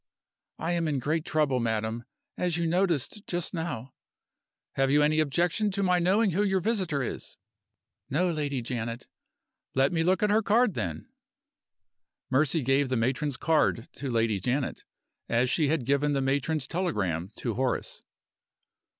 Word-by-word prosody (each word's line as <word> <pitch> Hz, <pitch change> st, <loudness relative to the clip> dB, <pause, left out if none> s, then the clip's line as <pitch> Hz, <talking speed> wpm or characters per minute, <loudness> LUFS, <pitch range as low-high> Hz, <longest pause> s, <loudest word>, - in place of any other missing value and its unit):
"I 165 Hz, -, -2 dB
am 170 Hz, -2 st, 0 dB
in 145 Hz, -2 st, 0 dB
great 155 Hz, +5 st, -1 dB
trouble, 145 Hz, -5 st, +1 dB
madam, 110 Hz, 0 st, -2 dB, 0.3 s
as 175 Hz, -2 st, 0 dB
you 170 Hz, -, 0 dB
noticed 175 Hz, -, 0 dB
just 175 Hz, -1 st, -2 dB
now 150 Hz, -8 st, -4 dB, 0.4 s
" -, -, -63 dB
"Have 135 Hz, 0 st, +3 dB
you 145 Hz, +2 st, +4 dB
any 155 Hz, +1 st, +3 dB
objection 170 Hz, +7 st, +1 dB
to 200 Hz, 0 st, 0 dB
my 180 Hz, -1 st, +3 dB
knowing 195 Hz, +4 st, +3 dB
who 185 Hz, +5 st, +1 dB
your 195 Hz, -2 st, +2 dB
visitor 185 Hz, -, 0 dB
is?" -, -, -6 dB, 0.7 s
"No, 175 Hz, +6 st, +1 dB
Lady 145 Hz, -5 st, -2 dB
Janet." 115 Hz, 0 st, -4 dB, 0.7 s
"Let 135 Hz, +1 st, +3 dB
me 165 Hz, -, +1 dB
look 185 Hz, +5 st, +2 dB
at 210 Hz, -, +3 dB
her 215 Hz, +2 st, +4 dB
card, 220 Hz, +1 st, +3 dB
then." 85 Hz, -, -4 dB, 1.2 s
Mercy 150 Hz, +3 st, +2 dB
gave 135 Hz, +1 st, +2 dB
the 130 Hz, -, +1 dB
matron's 130 Hz, +4 st, 0 dB
card 155 Hz, -6 st, +1 dB
to 140 Hz, 0 st, -5 dB
Lady 115 Hz, -4 st, +1 dB
Janet, 130 Hz, +7 st, -2 dB, 0.4 s
as 120 Hz, +2 st, +2 dB
she 155 Hz, -3 st, +2 dB
had 150 Hz, -4 st, 0 dB
given 140 Hz, +2 st, +2 dB
the 140 Hz, -, +1 dB
matron's 140 Hz, +2 st, 0 dB
telegram 100 Hz, -, -1 dB
to 120 Hz, -, -3 dB
Horace. 130 Hz, +2 st, -2 dB
145 Hz, 160 wpm, -28 LUFS, 125-175 Hz, 1.2 s, you